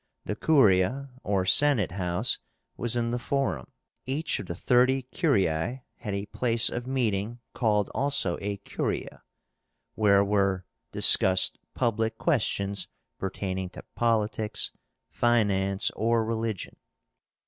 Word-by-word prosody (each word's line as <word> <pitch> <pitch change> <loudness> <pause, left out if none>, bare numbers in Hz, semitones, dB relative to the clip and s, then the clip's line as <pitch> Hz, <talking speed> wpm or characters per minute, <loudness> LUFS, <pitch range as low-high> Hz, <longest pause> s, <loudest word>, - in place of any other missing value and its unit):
The 105 - -3
CURIA, 130 - +3
or 100 -2 0
Senate 130 -1 +4
house, 90 -1 -1 0.4
was 120 0 -2
in 120 -1 0
the 120 - -1
Forum. 130 - -2 0.4
Each 150 +5 -1
of - - -7
the 85 - -4
thirty 130 +6 +2
curiae 120 - 0
had 105 -3 -4
a 100 +1 -3
place 115 +1 +2
of 120 +1 -4
meeting, 120 -3 -1
called 105 -4 +1
also 135 -10 +2
a 100 0 -3
curia, - - -4 0.7
where 100 -2 +4
were 100 -2 +1 0.3
discussed 95 0 +4 0.2
public 110 -1 0
questions 100 - 0 0.3
pertaining 95 -1 -3
to - - -8
politics, 110 -2 0 0.4
finance, 100 -5 +1
or 115 0 +1
religion. 110 -3 -3
110 Hz, 115 wpm, -27 LUFS, 100-120 Hz, 0.7 s, Senate